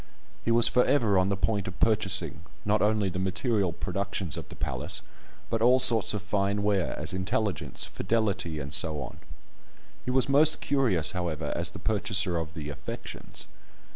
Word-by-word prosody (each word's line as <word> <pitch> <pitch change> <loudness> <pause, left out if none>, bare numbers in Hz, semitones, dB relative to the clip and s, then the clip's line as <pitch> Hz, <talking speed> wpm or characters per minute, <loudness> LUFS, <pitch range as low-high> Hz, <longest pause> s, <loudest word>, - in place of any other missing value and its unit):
He - - -2
was 115 0 +6
for 125 - +3
ever 110 -9 +2
on 95 +1 +1
the 100 - -1
point 100 0 -1
of 95 - -8
purchasing, 100 -8 +2 0.2
not 105 +1 +1
only 105 -1 +2
the 95 0 -3
material 95 +1 0
productions 90 -1 -2
of - - -8
the - - -10
place, - - -3 0.5
but 115 - 0
all 125 +2 +5
sorts 115 -5 +6
of 105 - -3
such - - -23
fine 100 0 0
ware 100 -4 0
as 75 +3 -2
"intelligence," 100 0 -2
"fidelity," 100 -6 -2
and 70 0 -6
so 80 -2 +2
on. - - -10 0.8
He - - -5
was 130 +1 +2
most 145 +3 +4
curious, 115 - +1
however, 80 -4 -3
as - - 0
the - - -10
purchaser 95 -4 +1
of 80 -1 -5
the 75 -3 -6
"affections." - - -8
100 Hz, 175 wpm, -27 LUFS, 90-110 Hz, 0.8 s, was